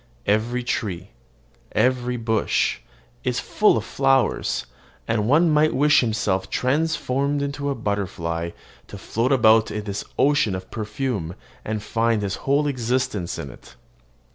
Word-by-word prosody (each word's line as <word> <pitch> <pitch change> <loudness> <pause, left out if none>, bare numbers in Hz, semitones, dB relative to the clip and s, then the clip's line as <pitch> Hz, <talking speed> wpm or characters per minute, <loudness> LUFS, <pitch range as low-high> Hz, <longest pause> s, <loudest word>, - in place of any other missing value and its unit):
Every 115 +4 +1
tree, 95 -6 -3 0.6
every 125 +2 +1
bush, 110 - 0 0.4
is - - 0
full - - +3
of - - -3
flowers; 135 - +1 0.4
and 110 -2 0
one 160 +5 +4
might 150 -1 +3
wish 145 +2 +5
himself 105 -5 -1
transformed 140 0 0
into 140 0 -3
a 140 - -1
butterfly, 85 -6 -2 0.4
to - - -9
float 115 +4 -1
about 110 -4 +5
in 105 0 -4
this 100 -1 -4
ocean 140 -8 +3
of 95 0 -8
perfume, 110 -5 -3 0.3
and 105 -1 -3
find 115 -1 0
his 100 -1 -2 0.2
whole 145 +2 +3
existence 125 -8 -1
in 70 - -6
it. - - -16
115 Hz, 135 wpm, -23 LUFS, 105-135 Hz, 0.6 s, wish